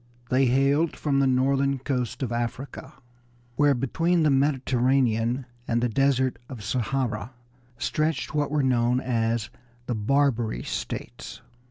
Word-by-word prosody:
They 130 +1 +4
hailed 140 +5 +2
from 140 -2 0
the 135 - +3
northern 135 +1 +2
coast 125 -2 -3
of 120 - -3
Africa, 120 +4 -4 0.6
where 145 -1 +4
between 165 +7 +1
the 150 - +4
Mediterranean 130 -3 +1 0.2
and 115 - +1
the 120 +1 0
desert 130 +2 +1
of 125 -6 -8
Sahara 125 0 -2 0.4
stretched 155 +4 -1
what 150 -1 0
were 150 -1 +1
known 125 -1 +2
as 115 -3 -1 0.3
the 120 - -2
Barbary 115 - +1
States. - - -6
130 Hz, 130 wpm, -25 LUFS, 120-140 Hz, 0.6 s, They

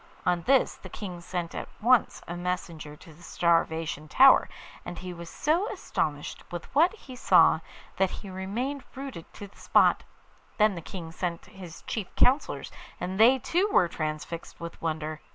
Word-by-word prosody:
On 175 -1 +2
this 270 0 +3
the - - -11
King 180 -4 -7
sent 170 -1 -4
at - - -5
once 240 +1 +3
a 175 - -5
messenger 175 -4 -4
to 160 +1 -15
the 155 - -19
Starvation 165 -3 0
Tower, 265 - +6 0.3
and 175 0 -7
he 180 +1 -6
was 170 -1 -9
so 340 - 0
astonished 150 - -3
with 175 -1 -5
what 335 +9 +4
he 265 -11 -12
saw - - +5 0.4
that 190 -1 +3
he 205 - -9
remained 230 +10 -3
rooted 265 -11 -8
to 205 - -8
the 200 - -17
spot. - - +4 0.6
Then 215 -1 +4
the 170 - -6
King 165 -1 -8
sent 170 -1 -4
his 185 -5 -11
chief 210 -5 -4
counsellors, 270 +4 +2 0.3
and 190 +2 -4
they 245 +4 +7
too 360 - 0
were 180 - +4
transfixed 155 +1 -5
with 170 0 -8
wonder. 155 -1 -3
180 Hz, 170 wpm, -27 LUFS, 165-245 Hz, 0.6 s, they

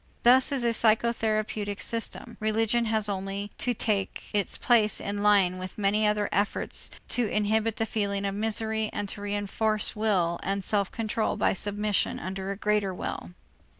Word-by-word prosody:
Thus 255 +3 +6
in 270 -3 -1
a 235 - +3
psychotherapeutic 215 -2 0
system, 230 0 -2
religion 225 +2 +1
has 220 -1 +2
only 195 +1 -4
to 245 -1 0
take 205 -3 -2
its 205 -2 +1
place 220 -4 +3
in 205 0 -3
line 195 -3 +4
with 185 0 -7
many 210 +1 +2
other 210 -1 +1
efforts 200 +1 -1 0.2
to 240 -3 +1
inhibit 220 +1 +1
the 225 - -1
feeling 200 -2 -1
of 195 - -1
misery 220 +1 0
and 205 -1 -3
to 205 - -6
reënforce 205 +1 -1
will 185 -6 +1
and 195 0 -2
self 200 -1 +1
control 225 -1 -1
by - - +2
submission 205 +1 0
under 190 +1 -5
a 200 - -3
greater 210 -2 0
will. 90 - -6
210 Hz, 160 wpm, -27 LUFS, 200-220 Hz, 0.2 s, Thus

